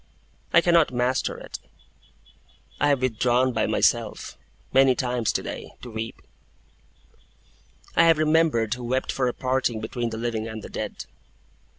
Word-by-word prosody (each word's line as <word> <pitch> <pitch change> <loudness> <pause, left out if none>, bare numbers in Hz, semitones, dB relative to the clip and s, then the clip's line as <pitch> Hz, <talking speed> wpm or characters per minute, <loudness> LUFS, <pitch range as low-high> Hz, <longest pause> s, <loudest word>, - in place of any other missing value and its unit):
I 170 - +6
cannot 170 -4 +4
master 125 +1 0
it. - - -8 1.2
I 145 - +3
have 140 -3 +2
withdrawn 125 +1 +2
by 110 - +1
myself, - - 0 0.4
many 135 -1 +5
times 125 -3 0
today, - - -5
to 125 - -8
weep. 110 +1 -6 1.7
I 165 - +6
have 165 -1 +5
remembered 155 -8 +2
Who 125 -1 -7
wept 130 +2 -1
for 130 -2 0
a 125 - -1
parting 130 -3 0
between 115 +2 -3
the 110 - -6
living 115 -1 -2
and 110 -1 -7
the - - -8
dead. - - -5
125 Hz, 145 wpm, -25 LUFS, 115-135 Hz, 1.7 s, I